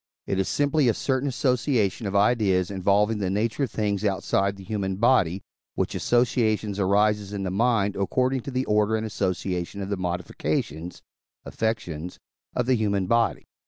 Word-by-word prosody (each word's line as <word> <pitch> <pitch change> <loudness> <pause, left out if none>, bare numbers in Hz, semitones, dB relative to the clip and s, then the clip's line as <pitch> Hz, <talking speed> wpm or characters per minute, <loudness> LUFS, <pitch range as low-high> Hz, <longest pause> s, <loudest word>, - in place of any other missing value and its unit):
It 95 - -1
is 95 - 0
simply 145 -2 +2
a 115 - +1
certain 135 +1 0
association 125 -5 0
of 100 - -4
ideas 100 -3 +2
involving 100 +3 +2
the 95 -2 -1
nature 110 +6 -1
of - - -9
things 105 -2 -1
outside 100 -1 0
the 100 - -11
human 95 -1 -2
body, 100 -5 +2 0.3
which - - -1
association 110 -3 +1
arises 105 +1 +2
in 100 -1 -3
the 95 - -2
mind 105 -1 +1
according 130 +6 0
to 130 - -7
the 130 0 -1
order 105 +1 +2
and 110 0 -2
association 95 -2 -2
of 100 0 -4
the 100 - -1
modifications 85 -2 -3 0.4
(affectiones) 90 -7 -3 0.4
of 125 - +1
the 130 - +3
human 100 -4 0
body. 115 +5 +1
105 Hz, 160 wpm, -25 LUFS, 95-115 Hz, 0.4 s, the